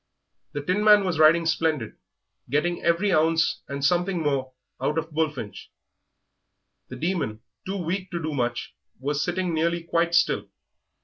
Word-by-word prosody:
The 145 - -4
Tinman 205 +4 +5
was 175 -4 -1
riding 165 +2 +6
splendid, 160 -7 0 0.6
getting 170 +6 0
every 170 +4 +2
ounce 160 0 +2
and 140 0 -3
something 175 +3 +2
more 135 -3 0 0.3
out 150 +4 0
of 160 0 -2
Bullfinch. 150 -9 -3 1.2
The - - -8
Demon, 155 - -2 0.3
too 195 +1 -2
weak 185 +2 -3
to 170 - -3
do 155 -1 -3
much, 120 - -2 0.3
was 145 +2 -1
sitting 180 -1 -1
nearly 170 +1 0
quite 170 0 +1
still. - - +2
165 Hz, 140 wpm, -25 LUFS, 145-175 Hz, 1.2 s, riding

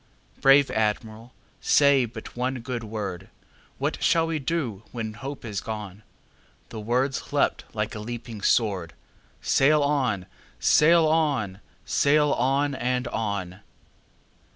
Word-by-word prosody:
Brave 135 +1 +6
Admiral, 110 +2 -2 0.3
say 140 -3 +4
but 110 -1 -10
one 125 +1 -2
good 120 0 -4
word:What 105 -5 -6
shall 165 -1 +3
we 165 -1 -2
do 130 - -2
when 110 -3 -4
hope 135 +5 -7
is 105 -3 -4
gone?"The 105 +1 -10
words 125 +5 -1
leapt - - +1
like - - -2
a - - -6
leaping 115 -1 -7
sword:"Sail 115 - 0
on! 130 -10 0 0.3
sail 160 - +5
on! 145 -12 +1 0.3
sail 150 +1 +3
on! 140 +3 +1
and 125 -1 -1
on!" 100 -4 -3
120 Hz, 110 wpm, -25 LUFS, 105-140 Hz, 0.3 s, Brave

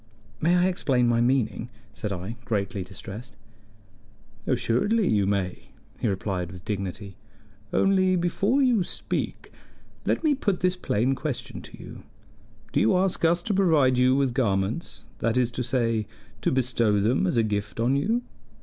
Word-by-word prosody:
"May 175 +3 +3
I 180 - +4
explain 135 -9 +1
my 120 0 +3
meaning?" 120 -2 +1 0.2
said 105 - -4
I, 95 +4 -4
greatly 100 -2 -2
distressed. 100 +5 -9 1.1
"Assuredly 205 - +1
you 100 -3 +2
may," 95 -3 -2 0.3
he - - 0
replied 95 -3 -2
with 90 -1 -11
dignity. 100 -1 -4 0.5
"Only 185 -1 +3
before 195 +10 +1
you 240 -7 +3
speak, - - -4 0.5
let - - 0
me 310 -2 +4
put 205 -9 -1
this 180 0 +2
plain 130 - 0
question 140 -1 -4
to - - -12
you: - - -10 0.7
Do - - +3
you 110 - +4
ask 185 -1 0
us 170 +1 +3
to 210 - -1
provide 155 -10 +4
you 130 +1 +4
with 135 -3 +1
garments 105 - -1 0.2
that 115 +1 0
is 125 -1 +2
to 125 - -3
say, 115 -3 0 0.3
to - - +1
bestow 120 -5 +2
them 105 -1 +2
as 120 - 0
a 115 - +4
gift 105 0 -3
on 120 +4 +2
you?" 225 +12 +1
125 Hz, 160 wpm, -26 LUFS, 105-175 Hz, 1.1 s, I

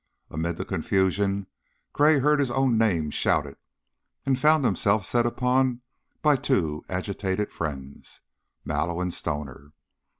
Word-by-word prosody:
Amid 85 +2 -2
the - - -4
confusion 100 +1 0 0.5
Gray 150 +1 +5
heard 150 +2 +3
his 140 -3 +1
own 130 -1 +2
name 90 -9 +1
shouted, - - 0 0.7
and 135 -2 +1
found 155 0 +4
himself 105 -3 +2
set 120 -1 +1
upon 125 0 +1 0.4
by 150 -2 +5
two 95 - 0
agitated 95 +2 -2
friends, 70 -4 -6 0.4
Mallow 85 0 -1
and 90 -1 -2
Stoner. 75 -2 -5
100 Hz, 125 wpm, -26 LUFS, 85-130 Hz, 0.7 s, Gray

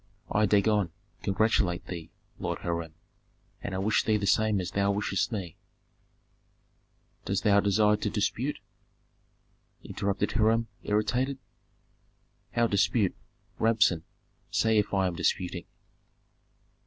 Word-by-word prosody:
"I, 105 0 +3
Dagon, 105 -2 +3 0.3
congratulate 95 -3 +1
thee, 85 -3 -7 0.3
Lord 85 -1 -2
Hiram, 85 -2 -3 0.7
and 100 - -4
I - - -1
wish 100 +3 +2
thee 110 -1 +2
the 100 - -2
same 110 0 +3
as 90 -1 -4
thou 100 0 +1
wishest 100 +1 -1
me 95 -7 -5 0.8
" - - -41
"Dost 95 0 -1
thou 100 -1 +5
desire 105 +1 +3
to - - -2
dispute?" - - -1 1.3
interrupted 100 0 -2
Hiram, 115 +1 +2
irritated. 125 +6 0 1.2
"How 120 - +3
dispute? 100 -1 +2 0.4
Rabsun, 110 -7 +3 0.5
say 110 -1 +3
if 105 - -1
I 95 -1 +2
am 90 - 0
disputing." 90 0 -1
100 Hz, 115 wpm, -28 LUFS, 95-110 Hz, 1.3 s, thou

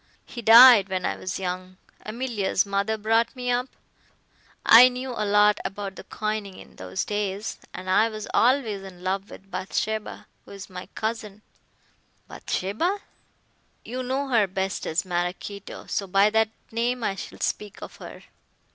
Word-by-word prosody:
He 240 - -8
died 230 -3 +9
when 185 -1 -2
I - - -1
was 185 - -5
young. 185 0 -5 0.3
Emilia's 215 -4 -1
mother 200 +2 -1
brought 225 +4 +1
me 250 -1 -2
up. 245 +1 0 1.0
I 245 +3 +9
knew 255 +1 -5
a 235 - -4
lot 210 0 +4
about 195 -1 -5
the - - -10
coining 215 -2 -4
in - - -15
those 95 0 -4
days, 205 0 -3
and 185 +1 -9
I 215 +4 +3
was 215 -1 -7
always 235 -5 +2
in 185 -2 -12
love 195 +2 -2
with 195 0 -14
Bathsheba, 215 +3 -3 0.2
who - - -13
is 195 0 -10
my 180 0 -8
cousin 215 -2 -4 0.4
" - - -39
"Bathsheba?" 335 - -2 0.8
"You 255 +2 -4
know 265 +2 -2
her 225 -5 +3
best 190 +1 -3
as 160 +4 -1
Maraquito, 180 +3 -4
so 200 - -3
by 195 +3 +4
that 220 0 +2 0.2
name 240 +2 -1
I 200 - 0
shall 195 - -9
speak 205 -2 -3
of - - -10
her. - - -11
210 Hz, 160 wpm, -25 LUFS, 190-230 Hz, 1.0 s, died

